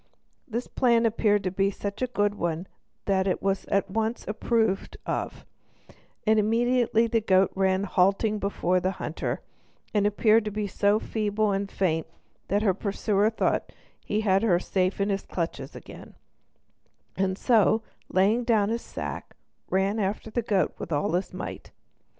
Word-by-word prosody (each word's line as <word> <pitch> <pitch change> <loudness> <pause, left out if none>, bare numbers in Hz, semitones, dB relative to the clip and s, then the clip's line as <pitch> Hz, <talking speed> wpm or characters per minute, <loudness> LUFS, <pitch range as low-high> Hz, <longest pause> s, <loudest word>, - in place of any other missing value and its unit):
This 235 +1 -3
plan 235 -2 +2
appeared 210 -3 +2 0.3
such 200 +2 -5
a 255 - +1
good 205 -4 0
one 170 -3 -2 0.4
that 190 -1 +1
it 185 - 0
was 195 0 -1
at 200 0 +1
once 225 +2 -1
approved 220 -2 0
of, - - -3 0.8
and 220 0 +4
immediately 230 +1 +2
the 230 0 +1
goat 190 -2 +3
ran 190 0 +1
halting 200 +3 +2
before 185 -2 0
the 185 +2 -1
hunter, - - -3 0.5
and 205 -1 +3
appeared 215 +2 +4
to - - -1
be 210 0 -3
so 205 +1 +2
feeble 215 -1 -1
and 195 0 -1
faint 160 -4 0 0.4
that 205 +2 +1
her 195 -4 +3
pursuer 205 +1 +1
thought 225 - -1 0.3
he 210 - -1
had 195 -2 +3
her 205 -6 +3
safe 185 +1 -1
in 200 +1 +1
his 195 -1 0
clutches 170 -2 -4
again, - - -11 1.0
and 190 0 0
so, 220 -2 +3 0.3
laying 205 +6 +3
down 220 -4 +2
his 230 +1 -1
sack, - - -7 0.3
ran 195 +3 +1
after 205 +2 -2
the 240 - 0
goat 205 -4 +1
with - - -6
all 145 0 0
his 180 +3 -1
might. - - -7
205 Hz, 155 wpm, -26 LUFS, 190-220 Hz, 1.0 s, and